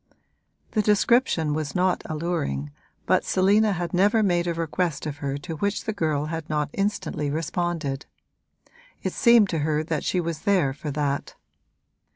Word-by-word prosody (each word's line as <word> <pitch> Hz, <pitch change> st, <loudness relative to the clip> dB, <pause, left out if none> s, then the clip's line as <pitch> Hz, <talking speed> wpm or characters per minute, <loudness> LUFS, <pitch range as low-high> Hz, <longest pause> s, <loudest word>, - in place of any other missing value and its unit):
The 215 Hz, -, +2 dB
description 210 Hz, -, +3 dB
was 150 Hz, -2 st, -3 dB
not 180 Hz, 0 st, +2 dB
alluring, 150 Hz, -, -2 dB, 0.3 s
but -, -, +3 dB
Selina 205 Hz, +3 st, +3 dB
had 175 Hz, -2 st, -3 dB
never 205 Hz, +4 st, +4 dB
made 175 Hz, -3 st, +1 dB
a 170 Hz, -, 0 dB
request 165 Hz, -2 st, -2 dB
of 145 Hz, -2 st, -4 dB
her 140 Hz, -1 st, -3 dB
to 160 Hz, +2 st, -6 dB
which 200 Hz, +5 st, -1 dB
the 220 Hz, -, -2 dB
girl 155 Hz, -7 st, 0 dB
had 160 Hz, 0 st, -5 dB
not 150 Hz, -1 st, -1 dB
instantly 195 Hz, -7 st, -1 dB
responded: 155 Hz, -2 st, -2 dB, 1.0 s
it -, -, -2 dB
seemed 235 Hz, -4 st, +5 dB
to 165 Hz, -, -1 dB
her 155 Hz, +1 st, 0 dB, 0.2 s
she 180 Hz, -, 0 dB
was 165 Hz, -2 st, -3 dB
there 185 Hz, -10 st, +2 dB
for 150 Hz, +2 st, -6 dB
that. 145 Hz, -1 st, -2 dB
165 Hz, 155 wpm, -25 LUFS, 150-190 Hz, 1.0 s, seemed